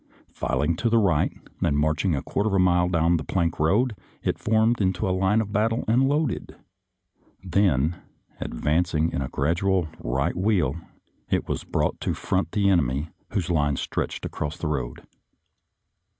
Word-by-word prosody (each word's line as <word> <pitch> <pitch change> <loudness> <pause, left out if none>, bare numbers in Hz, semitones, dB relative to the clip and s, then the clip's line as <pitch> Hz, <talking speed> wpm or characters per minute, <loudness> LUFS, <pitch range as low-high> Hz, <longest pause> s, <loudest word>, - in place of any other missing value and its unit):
Filing 80 +3 0
to 115 - +1
the 115 - +3
right, 95 -9 +3 0.3
and 70 - +2
march 75 +1 +1
ing 90 -5 +2
a 70 - -3
quarter 105 - -1
of 100 - +1
a - - +3
mile 90 -1 +3
down 85 0 +3
the - - -4
plank 85 -4 -1
road, 105 +10 +2 0.3
it - - -1
formed 110 +1 +2
into 95 +2 0
line 95 +4 +2
of 105 -2 -5
battle 115 +3 +1
and 125 +4 +3
loaded. 145 -2 -1 0.9
Then, 85 -5 +1 0.4
advancing 80 +4 0
in - - -2
a 65 - -3
gradual 85 +4 +1
right 70 +7 -1
wheel, 90 -7 +1 0.5
it - - 0
was - - -2
brought - - -1
to - - -1
front 80 - -1
the 100 -2 +2
enemy, 75 -5 +1 0.2
whose 90 -3 -1
lines 75 -4 +1
stretched - - -3
across 75 +3 -4
the 85 - -3
road. 65 -5 -3
90 Hz, 165 wpm, -25 LUFS, 75-100 Hz, 0.9 s, the